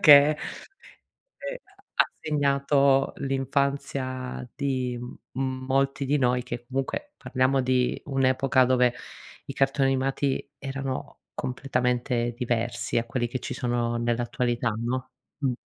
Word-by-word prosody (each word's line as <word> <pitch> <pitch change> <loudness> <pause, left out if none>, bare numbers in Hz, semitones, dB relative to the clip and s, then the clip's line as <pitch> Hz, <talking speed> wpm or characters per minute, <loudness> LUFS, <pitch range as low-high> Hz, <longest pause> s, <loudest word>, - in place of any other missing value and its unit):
che 145 0 +6 1.4
ha - - +6
ha - - -7 0.2
segnato 140 -2 +3
l'infanzia 135 -2 -1
di, 130 -3 -1 0.4
mhmm, 130 0 -2
molti 135 +1 +1
di 145 +2 +2
noi, 125 -1 +2
che 120 -1 -6
comunque 135 - -3
parliamo 130 +1 +1
di 125 -1 +1
un'epoca 130 -1 +3
dove 125 -1 +4 0.5
i 140 - -6
cartoni 135 0 +2
animati 135 +1 0
erano 135 -1 -4
completamente 125 -2 0
diversi 115 -2 0
a - - -1
quelli 120 0 -1
che 130 +2 -3
ci - - -5
sono 120 -1 0
nell'attualità 120 0 0
no, 125 +3 -2 0.3
mh. 135 -3 +1
130 Hz, 115 wpm, -27 LUFS, 125-135 Hz, 1.4 s, che